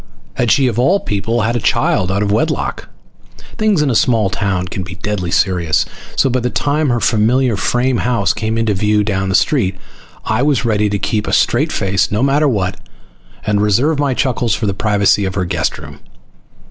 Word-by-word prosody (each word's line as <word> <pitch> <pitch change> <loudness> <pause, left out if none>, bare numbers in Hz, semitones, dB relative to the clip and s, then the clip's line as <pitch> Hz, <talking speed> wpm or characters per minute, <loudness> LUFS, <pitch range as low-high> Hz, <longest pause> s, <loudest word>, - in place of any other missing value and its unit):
Had 120 - -1
she, 135 +2 +3
of 120 -2 0
all 180 +11 +3
people, 115 - -2
had 115 +2 0
a - - 0
child 95 -3 +1
out 100 +2 0
of 100 - -1
wedlock? 105 - -1 0.7
Things 210 -7 +2
in 140 - +1
a - - 0
small 110 -3 +2
town 95 -2 -2
can 95 - -5
be 90 0 -8
deadly 95 -2 -3
serious, 90 -3 +1 0.3
so - - +2
by 130 0 0
the 125 0 -1
time 145 +3 0
her 120 -1 +1
familiar 115 +2 +2
frame 125 +4 0
house 115 -5 0
came 110 0 -2
into 115 -2 +1
view 105 +2 +1
down 95 -2 -1
the 95 - +1
street 105 -11 +1 0.5
I 110 +3 0
was 140 -3 +1
ready 105 -2 +1
to 100 - -1
keep 105 +1 -2
a - - -2
straight - - +2
face, 95 -1 0
no 105 +4 0
matter 145 +2 +2
what, 95 -7 -1 0.7
and 105 -1 +1
reserve 125 +9 +1
my 140 -3 0
chuckles 125 -5 0
for 115 - -3
the 100 - 0
privacy 100 0 +2
of 95 0 -3
her 95 -2 -1
guest 85 - -2
room. - - -11
110 Hz, 200 wpm, -16 LUFS, 100-125 Hz, 0.7 s, she